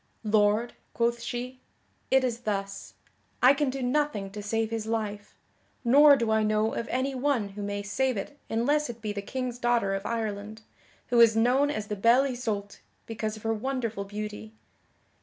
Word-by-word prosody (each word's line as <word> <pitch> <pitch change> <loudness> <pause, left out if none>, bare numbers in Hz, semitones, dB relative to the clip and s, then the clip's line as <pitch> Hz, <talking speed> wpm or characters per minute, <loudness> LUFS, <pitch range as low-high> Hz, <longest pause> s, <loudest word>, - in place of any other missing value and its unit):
"Lord," 215 +2 +2 0.2
quoth 235 0 +1
she, 245 +2 -5 0.5
"it 265 0 +4
is 240 -2 -1
thus; 200 -4 -4 0.5
I 255 +2 +8
can 285 -1 0
do 265 0 -4
nothing 250 -7 0
to 210 +1 -7
save 225 +2 -1
his 225 -1 -3
life, 210 -2 -3 0.5
nor 285 +4 +7
do 230 -4 -1
I 220 0 +3
know 215 +1 +1
of 230 - -3
any 260 +2 -1
one 255 -5 0
who 200 +1 -8
may 205 0 -3
save 255 +4 0
it 200 +9 -5
unless 285 +6 +1
it 235 -1 -7
be 215 -2 -4
the 205 - -4
King's 250 +2 -4
daughter 240 -5 +1
of 195 0 -3
Ireland, 220 -1 -4 0.5
who 240 -1 +3
is 230 -1 +7
known 255 +5 +3
as 215 -8 -3
the 210 - -4
Belle 235 +6 +4
Isoult 220 -6 -3 0.3
because 220 -1 -4
of 215 - -14
her 225 0 +1
wonderful 225 -3 -3
beauty. 210 +1 -7
225 Hz, 175 wpm, -27 LUFS, 210-255 Hz, 0.5 s, I